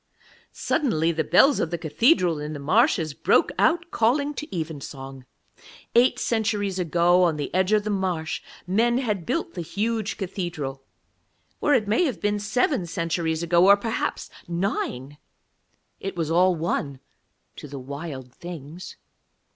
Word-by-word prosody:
Suddenly 170 - 0
the 160 -1 -1
bells 245 - +5
of 165 - 0
the 170 - -2
cathedral 165 - +2
in 150 +1 -5
the 145 - -6
marshes 165 - +2
broke - - +2
out, 340 +1 +2
calling 280 +6 +1
to 300 - -6
evensong. 140 -6 -6 0.7
Eight 240 +2 +4
centuries 210 -4 -1
ago 175 +1 +3
on 170 -4 +2
the 145 - -4
edge 185 +2 +2
of 215 -1 +3
the 210 - -2
marsh 180 -5 -2 0.2
men 230 +6 +2
had 210 -9 -2
built 325 +7 -2
the 175 - -4
huge 215 +6 -2
cathedral, 175 -8 -4 0.8
or 295 - +3
it 215 -4 +1
may 225 - +3
have 270 - -2
been 205 0 0
seven 215 - 0
centuries 165 -1 -1
ago, 170 +2 +4
or 200 +1 +8
perhaps 225 +2 -3 0.2
nine 150 - -3 0.8
it 195 0 -5
was 165 -2 -2
all 180 +2 +4
one 155 -4 -2 0.6
to - - -9
the 140 0 -8
Wild 135 -1 -7
Things. 170 0 -9
180 Hz, 145 wpm, -24 LUFS, 160-215 Hz, 0.8 s, or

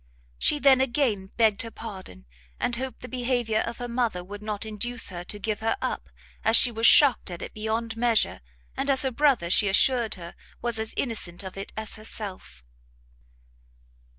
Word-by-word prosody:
She 300 - +3
then 270 -2 +5
again 240 -7 0
begged 220 -3 +3
her 230 - -5
pardon, 190 - -10 0.3
and 245 - 0
hoped 260 +2 -5
the 250 - -7
behaviour 245 -3 0
of 235 +1 -3
her 245 - -5
mother 235 -7 -1
would 205 +3 -9
not 210 0 -3
induce 230 +3 -2
her 175 -2 -6
to 205 - -3
give 210 0 -3
her 225 - 0
up, - - -4 0.3
as 225 - +5
she 245 - +5
was 225 0 +3
shocked 285 - +5
at 175 0 -6
it - - -8
beyond 225 +1 -3
measure, 230 -1 +2 0.4
and 280 - -2
as 270 -1 +4
her 265 - 0
brother, 255 - +2
she 205 - +4
assured 230 +3 +3
her, 170 -1 -9 0.3
was 235 -2 -2
as 220 0 -3
innocent 205 -8 -1
of 190 -1 -8
it 195 0 -7
as 220 0 -3
herself. 195 - -7
225 Hz, 180 wpm, -26 LUFS, 205-245 Hz, 0.4 s, then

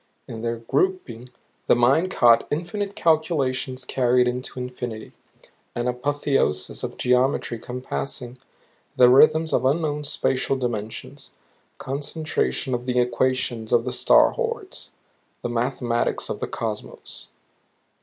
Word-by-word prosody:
In 110 - -7
their 115 0 -1
grouping 125 -1 -1 0.4
the - - +5
mind 135 +9 +3
caught 120 -9 +4
infinite 195 +6 -3
calculations 135 -6 0
carried 125 -1 +2
into 125 +1 -4
infinity; 125 -3 -6 0.6
an 120 +1 -1
apotheosis 135 - -1
of - - -5
geometry 125 -1 +1
compassing 125 +1 -5 0.6
the 125 -1 +7
rhythms 160 +5 +5
of 125 - +2
unknown 150 +2 0
spatial 135 -2 0
dimensions; 115 -4 -5 0.4
concentration 145 0 -2
of 125 +1 -3
the 125 0 0
equations 125 -2 0
of 115 0 +3
the 125 - -2
star 125 - +5
hordes. 465 -5 -4 0.5
The 120 - -2
mathematics 120 0 -1
of - - -4
the - - -3
Cosmos. - - -6
125 Hz, 115 wpm, -23 LUFS, 120-145 Hz, 0.6 s, the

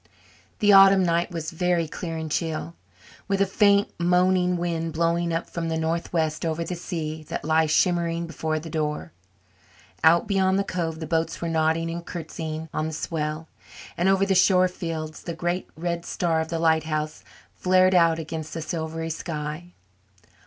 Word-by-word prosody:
The 205 -1 +4
autumn 195 -1 +8
night 170 0 +1
was 165 -2 -5
very 175 -1 0
clear 165 +1 -5
and 160 -1 -5
chill, 160 +1 -2 0.5
with 195 -1 0
a 195 - +4
faint, 200 +1 +3
moaning 180 +1 +3
wind 165 -2 -2
blowing 170 +1 +1
up 165 +1 -2
from 165 -1 -4
the 160 - -1
northwest 160 -1 -1
over 165 0 -1
the 180 - -4
sea 160 -3 -4
that - - -4
lay 160 0 +3
shimmering 170 +1 +1
before 160 -1 -2
the 155 +2 -6
door. 150 -2 -2 0.9
Out 170 +4 +5
beyond 190 -2 +2
the 200 - +1
cove 165 -4 -3
the - - -3
boats 165 +1 -1
were 170 - -3
nodding 160 +1 +1
and 170 +1 -5
curtsying 160 -2 -6
on 155 - -1
the 160 - -5
swell, 155 0 -3 0.5
and 175 +2 +2
over 195 0 +3
the 195 - +2
shore 185 0 +5
fields 165 -3 -5
the 170 - -5
great 175 +2 -2
red 170 0 -2
star 170 -2 0
of 160 - -3
the 165 - -3
lighthouse 160 -1 0 0.3
flared 185 0 +3
out 165 -2 +4
against 160 -1 -6
the 165 - -3
silvery 160 0 -4
sky. 155 +1 -5
165 Hz, 170 wpm, -25 LUFS, 160-180 Hz, 0.9 s, autumn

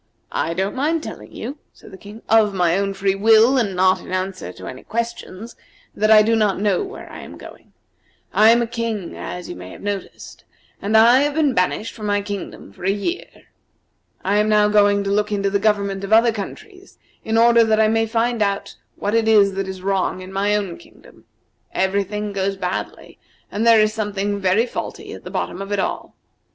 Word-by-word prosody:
"I 165 - -2
don't 190 +3 -1
mind 310 +4 0
telling - - -9
you," 290 +3 -7
said - - -16
the 190 - -11
King, 210 +3 -12
"of 215 -3 +3
my 175 -2 +2
own 195 0 -1
free 195 0 +1
will, 225 +6 +5
and 205 -6 -1
not 185 +1 +3
in - - -11
answer 185 - -3
to 95 - -11
any 130 0 -8
questions, 230 -1 -5 0.4
that 215 +1 0
I 215 -1 +8
do 225 +2 +2
not 210 -4 +1
know 205 - +1
where 395 +2 -9
I - - -9
am - - -10
going. - - -14 0.6
I 215 +1 +6
am 235 +1 +5
a - - -1
King, 230 -5 -4
as 180 0 -7
you - - -7
may 90 0 -10
have - - -12
noticed, 200 -2 -6 0.4
and 210 +2 +2
I 235 +3 +7
have 290 +1 0
been 300 -4 +2
banished 195 +3 -1
from 215 -1 -6
my 205 0 0
kingdom 200 -2 -7
for - - -14
a 190 - +1
year. 205 - -2 1.0
I 200 +2 +1
am 210 +1 +2
now 210 -1 +4
going 205 -1 +3
to 195 - -2
look 210 +1 0
into 200 -1 0
the 200 - +1
government 200 -2 0
of 195 - -5
other 230 +1 +5
countries 375 - -9 0.3
in 220 0 0
order 235 0 +6
that 220 -1 +2
I 220 - +5
may 225 +1 +1
find 230 +1 0
out 200 -1 -1 0.2
what 205 +1 -3
it 225 -1 +2
is 205 -3 +5
that 195 0 -3
is 190 -1 -7
wrong 190 -1 -1
in 185 +1 -10
my 200 +2 +1
own 195 -5 -3
kingdom. - - -19 0.5
Every 190 +1 +1
thing 210 +1 -5
goes 195 0 -1
badly, 180 -1 -5 0.3
and 220 +3 -1
there 230 -1 +7
is 215 0 +2
something 205 -1 -2
very 195 +4 +2
faulty 245 - -6
at - - -11
the - - -6
bottom 185 - -4
of 195 +1 -7
it 205 - 0
all. 190 - -3
205 Hz, 210 wpm, -20 LUFS, 195-225 Hz, 1.0 s, I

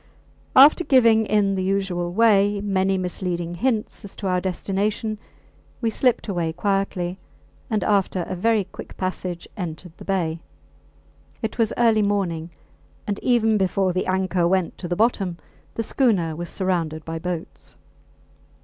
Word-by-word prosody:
After 290 +6 +8
giving 230 -7 +4
in 205 -2 +2
the 190 - -1
usual 185 -2 -1
way 205 -1 +4
many 195 -1 +1
misleading 180 -2 -3
hints 220 +4 -1
as 200 - -8
to - - -7
our 180 -1 +1
destination, 205 +4 -2 0.6
we 230 -2 0
slipped 250 +1 +1
away 170 -5 -1
quietly, 190 -1 -1 0.5
and 215 -3 0
after 195 -3 +1
a 185 - -5
very 220 +3 +2
quick 190 - -11
passage 185 -2 -4
entered 175 -1 -6
the - - -11
bay. 170 -4 -1 1.0
It 220 - -3
was 225 -2 +2
early 225 -2 +4
morning, 185 -5 -1 0.6
and 205 -1 -2
even 225 -3 +3
before 190 0 +1
the 185 - -1
anchor 185 -2 +1
went 185 -1 0
to 175 - -5
the 175 - -1
bottom 195 -5 +1 0.4
the 225 - -1
schooner 200 - +1
was 175 +1 -5
surrounded 165 -5 -2
by 165 0 -4
boats. 175 -1 -6
190 Hz, 145 wpm, -23 LUFS, 175-215 Hz, 1.0 s, After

